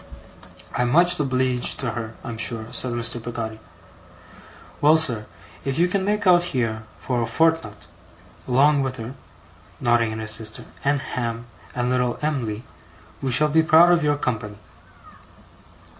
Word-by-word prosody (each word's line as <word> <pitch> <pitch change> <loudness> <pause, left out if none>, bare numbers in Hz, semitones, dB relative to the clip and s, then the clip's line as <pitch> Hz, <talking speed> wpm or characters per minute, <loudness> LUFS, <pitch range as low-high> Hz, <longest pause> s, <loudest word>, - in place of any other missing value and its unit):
'I'm 125 0 +1
much 175 +5 +4
obleeged 130 -3 0
to 125 -4 -2
her, 110 -1 -6
I'm 115 -3 -6
sure,' 115 +1 -1
said 125 0 +1
Mr. 120 0 -1
Peggotty. 115 -2 -5 1.2
'Well, 155 +2 +6
sir, 120 -9 +1 0.4
if 135 +1 -2
you 175 +2 +3
can 190 +1 0
make 205 +1 -1
out 180 -2 +6 0.2
here, 110 -3 -2
fur 125 -2 -2
a 115 - -1
fortnut, 165 +7 +1 0.7
'long 140 +3 +4
wi' 135 - 0
her,' 120 0 -7 0.7
nodding 120 -2 +2
at 110 - -5
his 110 -1 -1
sister, 110 0 +1 0.2
'and 140 0 +1
Ham, 115 -2 -4 0.3
and 125 0 -1
little 125 -1 0
Em'ly, 120 -8 -2 0.6
we 135 - -2
shall 150 +5 +4
be 160 +2 +4
proud 160 +2 +6
of 170 -2 +3
your 145 -1 +1
company. 105 -6 -3
125 Hz, 150 wpm, -23 LUFS, 115-150 Hz, 1.2 s, Well